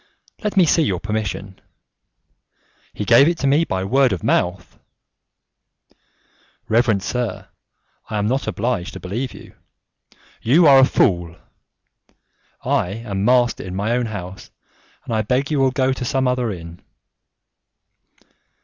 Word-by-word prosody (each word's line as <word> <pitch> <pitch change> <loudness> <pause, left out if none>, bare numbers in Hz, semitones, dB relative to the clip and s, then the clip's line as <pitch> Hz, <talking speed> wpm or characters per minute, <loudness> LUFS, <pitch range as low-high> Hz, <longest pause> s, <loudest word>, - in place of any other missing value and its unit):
"Let 210 -1 -2
me 185 - +6
see 165 - +3
your 95 - 0
permission." 105 -2 -4 1.3
"He 105 - -5
gave 120 +6 +6
it 170 0 0
to - - -3
me 145 +4 +3
by 95 -8 -2
word 130 +5 +2
of 95 -5 -3
mouth." 90 -1 -1 1.9
"Reverend 110 -3 +2
sir, 125 +1 -4 0.6
I 105 - -3
am 105 - 0
not 130 +5 -1
obliged 100 -8 -2
to - - -8
believe 115 +8 -4
you." - - -13 0.9
"You 155 +9 +4
are 140 -2 +8
a 130 - +7
fool." 85 -8 +1 1.3
"I 90 - +1
am 100 -3 -4
master 120 0 +2
in 90 -1 -7
my 100 +4 -1
own 120 0 0
house, 95 -3 -8 0.6
and 115 - -4
I 110 - +1
beg 130 +7 -1
you 150 - +1
will 135 -1 +3
go 130 0 0
to 130 - -6
some 130 +1 0
other 125 -3 0
inn." 85 -2 -9
115 Hz, 140 wpm, -20 LUFS, 95-130 Hz, 1.9 s, are